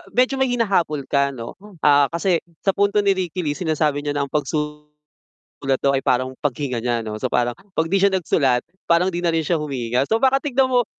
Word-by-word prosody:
medyo 255 +2 +3
ma 265 - +3
may - - -3
hinahabol 175 - 0
ka 140 -1 +1
ano. 115 -1 -7 0.3
Ah, 145 -1 +5
kasi 170 -1 +1 0.2
sa 195 - +3
punto 200 +1 +1
ni 200 - +4
Ricky 180 -1 -3
Lee 145 +1 -2
sinasabi 155 -4 0
niya 145 0 -2
na 140 - +1
ang - - -26
pagsusulat 150 0 -4 0.7
daw 140 - +4
ay - - -3
parang 130 +1 +1
paghinga 135 -3 -2
niya 120 -1 -1
'no. 110 0 -5
So, - - -1
parang 120 0 +1 0.2
'pag 160 0 +1
'di 195 - +3
siya 200 - +5
nagsulat, 135 -8 +1 0.2
parang 175 +2 +3
di 170 - -3
na 170 - +2
rin 160 - +1
siya 165 0 0
humihinga. 130 -3 -1
So, 225 +1 +1
baka 265 0 +4
tignan 265 -2 +1
mo, 245 -2 +3
150 Hz, 220 wpm, -21 LUFS, 140-190 Hz, 0.7 s, Ah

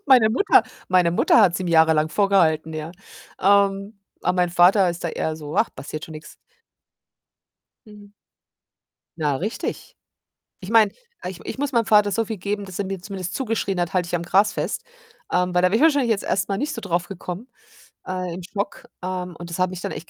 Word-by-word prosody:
Meine 245 -5 +6
Mutter 400 - +4 0.3
meine 180 -2 +4
Mutter 175 - +4
hat's 180 -5 +4
ihm 185 - -3
jahrelang 160 -2 +4
vorgehalten, 165 -5 +2
ja. 155 +1 -5 0.5
Ähm, 200 +1 +2 0.2
aber 180 - 0
mein 180 -1 +2
Vater 180 +2 +5
ist 170 0 -7
da - - 0
eher 160 0 -2
so: 150 -1 -7
„Ach, - - +3
passiert 155 +2 -7
schon 160 - -11
nix." 155 0 -11 1.5
Mhm. 210 -1 -14 1.1
Na, 150 -3 0
richtig. 210 +11 -5 0.6
Ich 185 - -8
meine, 225 -2 +5 0.3
ich 180 -1 -6
ich - - -6
muss 285 0 -2
meinem 235 -2 +2
Vater 210 -2 +4
so 225 +2 +1
viel 220 0 -5
geben, 205 +2 -3
dass 190 -2 -8
er 200 - -1
mir 190 -1 -5
zumindest 190 -1 -6
zugeschrien 220 -7 -1
hat: 175 -1 -2
„Halt 185 -1 +1
dich 175 - -5
am 175 - 0
Gras 195 +4 +3
fest.“ - - -3 0.5
Ähm, 180 0 +1
weil 180 - +3
da 180 - +5
wäre 200 - +1
ich 230 - +1
wahrscheinlich 285 -6 +4
jetzt 210 -3 +1
erst 190 -1 0
mal 195 -1 -1
nicht 295 +3 -2
so 230 - -5
drauf 175 -4 -2
gekommen, 190 +4 -7 0.6
äh, 185 -2 -3
im 180 - -7
Schock. 205 +6 -5 0.2
Ähm, 180 -1 -4
und 175 0 -9
das 170 - -5
hat 185 - +2
mich 180 -1 -7
dann - - -4
echt 165 - -8
185 Hz, 205 wpm, -22 LUFS, 175-205 Hz, 1.5 s, Meine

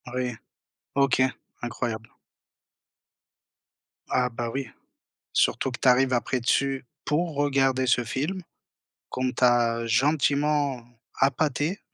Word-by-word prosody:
Oui, 125 -1 -1 0.6
OK, 135 -2 +3 0.4
incroyable. 115 -2 -4 2.0
Ah 125 0 +1
bah, 120 0 -4
oui, 135 +2 -3 0.7
surtout 135 - +2
que 120 - -7
tu - - +3
arrives 130 +1 +4
après 125 +1 0
dessus 135 +2 +1 0.2
pour 165 +2 0
regarder 135 -2 +2
ce 125 0 +2
film 150 +11 -3 0.7
qu'on 130 0 -1
t'a 120 -2 +2
gentiment 140 +1 +1 0.4
appâté, 145 +6 +1
130 Hz, 100 wpm, -26 LUFS, 120-140 Hz, 2.0 s, arrives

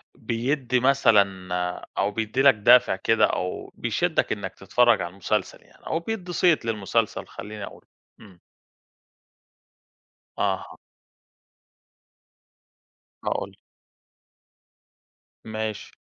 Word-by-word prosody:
بِيِدّي 125 +1 -1
مثلًا 100 -9 +3
آآ 90 0 -3
أو 100 +1 +1
بِيِدّي 110 +4 -1
لك 140 -2 +7
دافع 120 0 +5
كده، 115 +4 +3
أو 90 0 -3
بيشدك - - 0
إنك - - -4
تتفرج 120 -5 +3
على 85 - -4
المسلسل 100 +2 -2
يعني، - - -18
أو 165 - 0
بِيِدّي 180 -1 -5
صيت 170 -8 +3
للمسلسل 110 0 -1
خلّيني 105 0 -8
أقول، - - -10 0.3
إمم. 95 -4 -17 2.0
أها. - - -2 2.5
هاقولك. - - -3 1.9
ماشي. 110 -1 -5
110 Hz, 95 wpm, -25 LUFS, 100-125 Hz, 2.5 s, لك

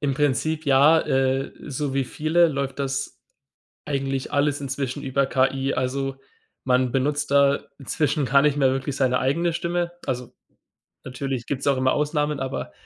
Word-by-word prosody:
Im 140 -2 0
Prinzip 150 +2 0
ja, 145 +4 +6
äh, 135 -1 0 0.2
so 140 0 -3
wie 135 - +1
viele 160 +6 +2
läuft 140 -2 -3
das 135 -1 -3 0.7
eigentlich 135 -2 -2
alles 145 0 +1
inzwischen 135 0 -4
über 135 +1 +1
KI. 135 +1 +1
Also 135 +1 -2 0.5
man 125 -1 +2
benutzt 140 +3 0
da 140 0 +4 0.2
inzwischen 145 +2 0
gar 140 +2 +4
nicht 145 0 +2
mehr 135 -2 +3
wirklich 135 +1 -2
seine 125 -2 +2
eigene 165 +6 0
Stimme. 175 +1 -1
Also 125 -2 -4 0.7
natürlich 130 -1 -4
gibt's 135 -1 -3
auch 140 -1 +3
immer 130 0 +2
Ausnahmen, 150 -1 0
aber 135 0 -4
135 Hz, 155 wpm, -24 LUFS, 130-145 Hz, 0.7 s, ja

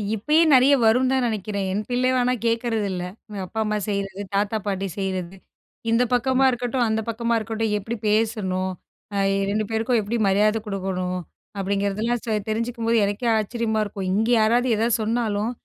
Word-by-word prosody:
இப்பயே 300 +10 +3
நிறைய 260 +2 +6
வரும்னு 250 +4 +4
தான் 260 -2 +2
நினைக்கிறேன், 205 -2 -2
என் 200 +3 -1
பிள்ளை 250 +1 +1
ஆனா 250 0 +2
கேட்குறதில்ல, 225 -5 0 0.3
எங்க 205 -2 -6
அப்பா 220 - -5
அம்மா 215 0 -1
செய்றது, 200 -1 -3
தாத்தா 205 +2 +1
பாட்டி 195 -1 -1
செய்றது 190 -1 -3 0.5
இந்த 230 +2 +4
பக்கமா 260 +2 +3
இருக்கட்டும், 245 0 -1
அந்த 220 0 0
பக்கமா 235 +1 0
இருக்கட்டும், 220 0 -2
எப்படி 225 +4 -4
பேசணும், 210 -4 0 0.4
அ - - 0 0.3
2 215 +1 0
பேருக்கும் 225 +2 +1
எப்படி 215 +3 -2
மரியாதை 210 +3 +2
கொடுக்கணும், 185 -2 -2 0.4
அப்படிங்கிறதெல்லாம் 200 +4 -1 0.3
தெரிஞ்சுக்கும்போது, 230 +1 0
எனக்கே 205 +4 -1
ஆச்சரியமா 220 0 -1
இருக்கும், 195 -2 -4
இங்க 220 +4 +1
யாராவது 235 +4 +3
எத 230 +2 +1
சொன்னாலும் 220 -1 0
220 Hz, 150 wpm, -23 LUFS, 200-235 Hz, 0.5 s, நிறைய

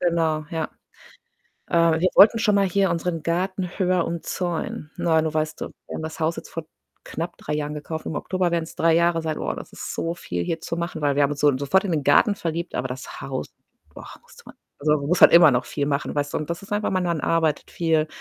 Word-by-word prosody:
Genau, 165 -3 +1
ja. 165 -2 -2 1.0
Äh, 165 -1 +3
wir 185 - +3
wollten 220 +3 +8
schon 210 -2 +2
mal 200 -1 +4
hier 195 +1 +2
unseren 170 -1 -2
Garten 180 +2 -1
höher 180 -2 +2
umzäunen. 170 -2 -4
Ne, 165 -2 +2
du 160 -1 -2
weißt, 155 0 -2
wir - - -4 0.2
haben - - -4
das 160 +1 -6
Haus 160 +2 0
jetzt - - -9
vor 165 - -5 0.4
knapp 170 +2 -5
3 - - -4
Jahren 150 0 -3
gekauft, 160 +1 -6
im - - -3
Oktober 185 +3 -1
werden's 165 -1 -2
3 165 0 +3
Jahre 170 0 +2
sein. 155 -1 -2
Boah, - - -3
das - - -9
ist - - -6
so 165 +1 -2
viel 90 - -4
hier 165 - -3
zu 165 - -4
machen, 170 -1 -4
weil 145 -2 +1
wir 145 - +4
haben 140 - +3
uns 145 - -6
so 145 -3 +4
sofort 145 +9 +2
in 195 - -2
den 155 -4 0
Garten 205 +8 +5
verliebt, 170 -1 -4
aber 130 - -1
das 130 0 -8
Haus, 130 - -4 0.5
boah, - - -10
musste - - -18
man - - -12 0.2
also 150 +1 +2
man 140 - -5
muss 180 +3 +1
halt - - +9
immer 170 -3 +8
noch 125 +1 +1
viel 145 -1 -3
machen, 140 0 -1
weißt 145 -1 -2
du? - - +1
Und 155 - -6
das 170 +2 -4
ist 195 - -10
einfach 205 0 0
mein 185 -1 0
Mann 170 -3 -1
arbeitet 160 -3 0
viel 160 -2 +1
165 Hz, 240 wpm, -23 LUFS, 150-175 Hz, 1.0 s, halt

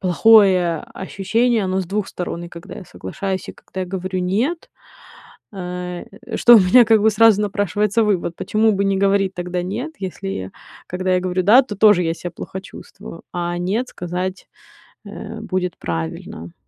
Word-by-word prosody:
плохое 185 -2 +5 0.2
ощущение, 215 +4 0
оно 190 +1 0
с - - -3
двух 205 +2 -2
сторон 175 -1 -5
и - - -9
когда 170 0 -10
я 185 - -9
соглашаюсь, 185 - -5
и - - -6
когда 190 - -9
я 185 - -3
говорю 185 0 -3
нет, 230 - -1 0.8
э, 180 -1 -6 0.3
что 240 -1 +8
у - - +7
меня 210 +7 +6
как 220 -2 +4
бы 220 - +5
сразу 215 -1 +5
напрашивается 205 +2 0
вывод: 180 -4 -1
почему 220 0 +1
бы 200 0 0
не 195 0 +1
говорить 195 -1 +2
тогда 180 0 -3
нет, 235 - -4
если 190 - -5 0.4
когда 185 +1 -1
я 180 - +2
говорю 185 0 -1
да, 230 +7 +7
то 210 -5 -7
тоже 205 -3 +5
я 165 0 0
себя 175 +1 -7
плохо 190 +3 -7
чувствую, 165 -2 -12
а 175 0 -3
нет 210 +8 -1
сказать, 180 +1 -5 0.6
э, 215 +2 -8
будет 185 -5 -3
правильно. 80 0 -6
190 Hz, 170 wpm, -20 LUFS, 180-210 Hz, 0.8 s, что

